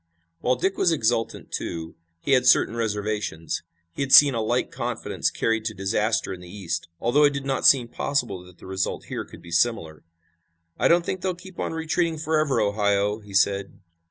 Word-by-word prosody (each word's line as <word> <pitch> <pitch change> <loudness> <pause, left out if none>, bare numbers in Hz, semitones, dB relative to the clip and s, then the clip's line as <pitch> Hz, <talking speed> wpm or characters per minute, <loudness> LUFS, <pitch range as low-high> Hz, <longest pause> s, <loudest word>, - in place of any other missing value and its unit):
While 125 - +1
Dick 190 +10 -1
was 175 - +3
exultant, 115 -6 -1
too, 80 -1 -5 0.3
he - - -2
had 130 -2 +4
certain 115 - +4
reservations. 105 -7 -2 0.3
He - - -5
had 135 -1 -2
seen 145 -1 +9
a 115 - -1
like 110 - 0
confidence - - -2
carried 115 -1 -1
to 110 -1 -3
disaster 105 +2 0
in 90 - -9
the 90 - -12
East, 85 -4 -4
although 140 +6 +3
it 145 -1 +4
did 140 -1 -4
not 135 -1 +2
seem 125 -4 +5
possible 120 -8 -2
that 90 -1 -17
the - - -15
result 95 0 -3
here - - -3
could - - -14
be 85 - -12
similar. 85 -5 0 0.8
"I - - +4
don't 170 0 +4
think 185 - -3
they'll 185 -1 -1
keep 180 +1 -13
on - - -2
retreating 160 +1 -1
forever, 155 -2 +1
Ohio," 100 0 +1
he 105 -2 -11
said. 100 0 +1
115 Hz, 190 wpm, -24 LUFS, 100-140 Hz, 0.8 s, seen